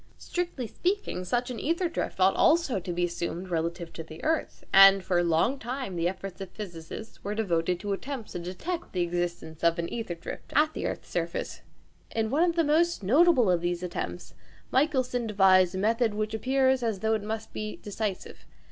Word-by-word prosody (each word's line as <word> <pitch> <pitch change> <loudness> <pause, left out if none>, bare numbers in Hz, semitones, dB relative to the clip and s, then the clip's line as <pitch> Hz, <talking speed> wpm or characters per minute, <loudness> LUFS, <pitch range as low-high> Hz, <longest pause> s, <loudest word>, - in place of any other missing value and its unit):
Strictly 350 -8 -3
speaking, 360 - -2
such 245 +7 -1
an 240 - -5
ćther 335 +2 0
drift - - -3
ought 190 +1 +5
also 315 - +3
to 180 0 -5
be 175 +1 -1
assumed 175 +1 -4
relative 170 0 -2
to - - -6
the 160 0 -11
earth, 320 0 -1
and 195 0 +8
for 180 -2 +1
a - - +2
long 170 +11 +2
time 245 -4 -4
the 170 0 +1
efforts 190 0 -7
of 190 - -5
physicists 185 +2 -8
were 205 +1 -3
devoted 180 -4 0
to 205 0 -2
attempts 255 +2 -5
to - - -4
detect 185 - -5
the 180 - 0
existence 175 -2 -3
of 170 0 +4
an 170 0 -2
ćther 200 -8 -4
drift - - -8
at 305 +1 +4
the - - -2
earth's - - -6
surface. - - -3 0.5
In 220 0 0
one 295 +4 +2
of 335 - -2
the 335 - +3
most 320 -2 +2
notable 255 - +5
of 175 -2 +2
these 175 0 -2
attempts 90 - -5 0.4
Michelson 255 -4 +1
devised 190 -3 +4
a - - -2
method 225 +2 +1
which 215 0 -2
appears 260 +2 +2
as 225 -5 -1
though 220 0 +2
it 220 - 0
must 220 +1 -5
be 215 0 -4
decisive. 205 -2 -5
205 Hz, 195 wpm, -28 LUFS, 175-255 Hz, 0.5 s, and